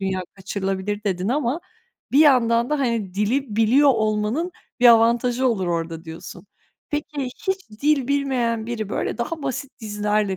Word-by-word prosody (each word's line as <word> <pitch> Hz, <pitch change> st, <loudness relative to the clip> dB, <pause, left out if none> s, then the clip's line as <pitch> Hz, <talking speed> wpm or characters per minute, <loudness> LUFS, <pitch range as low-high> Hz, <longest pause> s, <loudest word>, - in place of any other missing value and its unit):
dünya 190 Hz, -1 st, -1 dB
kaçırılabilir 195 Hz, +1 st, -3 dB
dedin 190 Hz, -1 st, -1 dB
ama 270 Hz, +3 st, 0 dB, 0.5 s
bir 280 Hz, -, +4 dB
yandan 240 Hz, -5 st, +4 dB
da, 300 Hz, -, +1 dB
hani, 230 Hz, -8 st, -1 dB
dili 215 Hz, +3 st, -1 dB
biliyor 250 Hz, +6 st, +5 dB
olmanın 220 Hz, +7 st, 0 dB, 0.3 s
bir 245 Hz, -, +7 dB
avantajı 235 Hz, +2 st, +4 dB
olur 200 Hz, -6 st, -1 dB
orada 165 Hz, -1 st, -3 dB
diyorsun. 160 Hz, 0 st, -10 dB, 0.4 s
Peki, 295 Hz, -1 st, -3 dB, 0.2 s
hiç 380 Hz, -, -2 dB
dil 290 Hz, -3 st, +2 dB
bilmeyen 250 Hz, -5 st, 0 dB
biri, 225 Hz, -3 st, -4 dB
böyle, 220 Hz, -, -3 dB
daha 305 Hz, +6 st, -3 dB
basit 265 Hz, 0 st, -5 dB
dizilerle, 210 Hz, -2 st, -1 dB
230 Hz, 145 wpm, -22 LUFS, 205-270 Hz, 0.5 s, bir